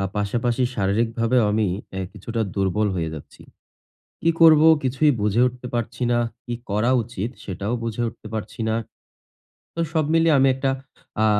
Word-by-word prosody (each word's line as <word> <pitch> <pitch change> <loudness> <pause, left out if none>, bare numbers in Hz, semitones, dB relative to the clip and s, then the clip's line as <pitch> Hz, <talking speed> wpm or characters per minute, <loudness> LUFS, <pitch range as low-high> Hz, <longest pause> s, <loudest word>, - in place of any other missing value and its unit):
আ - - 0
পাশাপাশি 120 +4 0
শারীরিকভাবেও 115 +4 +1
আমি 110 0 +2 0.3
এ - - -2
কিছুটা 115 +3 -5
দুর্বল 100 +2 +1
হয়ে 80 -2 -2
যাচ্ছি। 75 - -12 0.8
কি 165 - +4
করবো? 160 -1 +7 0.2
কিছুই 135 +3 +2
বুঝে 105 +2 +1
উঠতে 125 0 -5
পারছি 120 +1 -3
না। 120 - +3 0.3
কি 120 - -3 0.2
করা 105 +5 +1
উচিত? 115 -1 -5
সেটাও 100 +3 -4
বুঝে 115 0 -3
উঠতে 110 -1 -12
পারছি 110 +1 -6
না। 110 - +1 1.0
তো - - -7
সব 160 -2 +2
মিলিয়ে 165 -2 +4
আমি 135 - +5
একটা 135 0 0 0.5
আ - - +5
115 Hz, 160 wpm, -23 LUFS, 105-130 Hz, 1.0 s, করবো